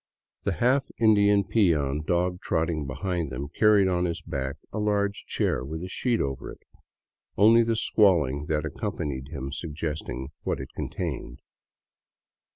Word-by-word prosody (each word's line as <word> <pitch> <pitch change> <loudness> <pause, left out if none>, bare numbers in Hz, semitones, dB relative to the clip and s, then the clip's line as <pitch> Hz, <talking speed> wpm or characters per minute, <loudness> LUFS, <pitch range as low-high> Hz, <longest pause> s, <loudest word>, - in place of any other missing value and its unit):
The 100 - +1
half 130 - +2
Indian 105 -2 +5
peon 80 -9 +2
dog 90 +3 0
trot 80 +1 0
ting 75 -4 -2
behind 85 +2 -2
them 70 +3 -5
carried 105 +2 +4
on 90 -1 +1
his 85 -1 -2
back 65 0 -4 0.2
a 110 - -2
large 105 -1 0
chair - - 0
with 80 +5 -5
a - - -4
sheet 120 +4 0
over 70 -1 -3
it, - - -14 0.7
only 115 +4 +7
the 115 0 +1
squalling 80 - +3
that 75 -2 0
accompanied 65 -3 -4
him 70 -2 -6
suggesting 75 -3 -4
what - - -2
it - - -7
con - - -3
cealed. - - -5
85 Hz, 155 wpm, -26 LUFS, 70-100 Hz, 0.7 s, only